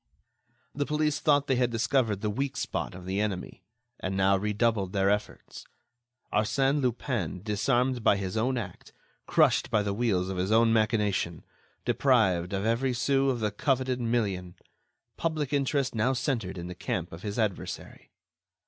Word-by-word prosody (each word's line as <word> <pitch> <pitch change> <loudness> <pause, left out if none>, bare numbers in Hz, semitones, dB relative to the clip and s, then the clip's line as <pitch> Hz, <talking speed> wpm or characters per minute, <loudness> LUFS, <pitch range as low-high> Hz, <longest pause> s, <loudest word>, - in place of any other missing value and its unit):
The 145 0 -2
police 150 -1 0
thought 145 -2 +3
they 130 -3 +1
had 125 -1 +2
discovered 115 -3 +1
the 105 - -1
weak 135 +4 -2
spot 120 - -3
of 90 -1 -10
the 95 +2 -2
enemy, 100 -4 -3 0.4
and 95 +1 -3
now 95 0 +4
redoubled 105 -1 0
their 100 0 +3
efforts. 105 0 -4 0.7
Arsène 135 +6 +2
Lupin 120 - -2
disarmed 120 +3 +1
by 100 - +4
his 95 0 -4
own 125 +4 +1
act, 110 -6 -7 0.3
crushed - - +3
by 105 -2 +2
the 100 -1 -1
wheels 100 -5 +1
of 95 - -3
his 95 +3 -1
own 115 0 +5
machination, 105 -6 +1 0.4
deprived 90 -1 +2
of 100 +1 -2
every 120 +3 +1
sou 135 +2 +2
of 125 -3 -1
the 105 -1 0
coveted 130 +3 0
million... 100 -7 -1 0.6
public 155 -4 -2
interest 140 -1 +1
now 120 +4 +1
centered 120 -7 -2
in 85 - -5
the 90 - -6
camp 90 0 -3
of 80 - -9
his 105 +1 -4
adversary. 110 -5 -3
110 Hz, 160 wpm, -28 LUFS, 95-130 Hz, 0.7 s, own